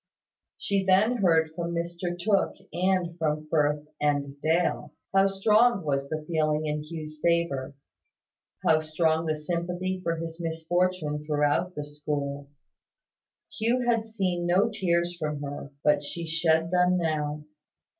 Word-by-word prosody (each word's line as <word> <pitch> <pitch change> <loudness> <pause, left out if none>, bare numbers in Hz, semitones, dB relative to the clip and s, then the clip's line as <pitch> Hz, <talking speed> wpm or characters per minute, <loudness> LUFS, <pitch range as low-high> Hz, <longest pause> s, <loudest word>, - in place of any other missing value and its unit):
She 200 -1 0
then 195 +6 +3
heard 165 -6 +3
from 170 0 -3
Mr 175 +1 -3
Tooke 195 +2 +1 0.2
and 180 -2 +1
from 155 -1 -1
Firth 150 -1 +1
and 145 -1 0
Dale, 165 +2 0 0.2
how 195 0 +5
strong 210 +2 +3
was 140 -1 -1
the 155 -1 -4
feeling 155 -2 +1
in 150 0 -2
Hugh's 155 -1 -7
favour 170 -6 0 0.9
how 155 - +5
strong 160 +1 +1
the 155 - +1
sympathy 175 +4 -2
for 165 -2 -1
his 165 +1 -6
misfortune 165 -1 -1
throughout 150 +4 +1
the 150 - -4
school. 145 -1 -4 1.1
Hugh 240 0 +1
had 235 -2 +2
seen 190 -6 -2
no 195 +6 +3
tears 175 -2 0
from 150 -2 -3
her; 140 0 -6
but 150 - +3
she 165 +4 -5
shed 160 +1 +2
them 180 0 +3
now. 150 -3 -1
165 Hz, 135 wpm, -27 LUFS, 150-180 Hz, 1.1 s, how